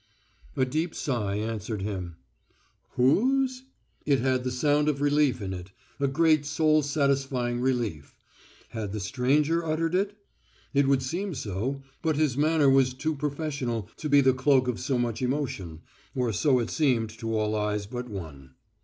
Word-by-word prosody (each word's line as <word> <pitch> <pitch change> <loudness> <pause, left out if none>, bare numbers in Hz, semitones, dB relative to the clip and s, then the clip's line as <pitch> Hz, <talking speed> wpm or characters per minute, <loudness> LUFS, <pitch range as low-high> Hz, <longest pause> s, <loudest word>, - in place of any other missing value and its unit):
A 130 - +3
deep 155 +6 -2
sigh 105 -8 -1
answered 110 -1 -3
him. 95 -5 -4 0.8
Whose? 255 - +2 0.4
It 140 -2 +3
had 130 0 +1
the 130 - -1
sound 145 +4 +2
of 140 -2 -1
relief 145 -5 +2
in 95 -1 -3
it, 90 0 -8 0.3
a 140 - +2
great 155 +1 +3
soul 155 +1 +2
satisfying 135 -4 0
relief. 120 - -2 0.5
Had 105 -4 -5
the 110 - -3
stranger 140 - +1
uttered 165 +1 -1
it? 200 +2 0 0.6
It 140 -1 +3
would 135 -1 +3
seem 175 +6 -3
so, 125 +5 -3 0.2
but 160 -2 +1
his 150 -4 +1
manner 150 0 +3
was 135 -1 +4
too 155 +4 -1
professional 140 - -3
to 155 - -4
be 145 0 +6
the 130 -1 +4
cloak 130 0 +3
of 125 -2 -1
so 130 0 -1
much 120 -1 -1
emotion, 125 - -3 0.3
or 125 -3 0
so 130 - +3
it 115 -2 -1
seemed 125 -8 +1
to 115 -2 -2
all 105 0 0
eyes 105 -1 -1
but 125 +3 -6
one. 70 -10 -9
130 Hz, 160 wpm, -27 LUFS, 115-150 Hz, 0.8 s, be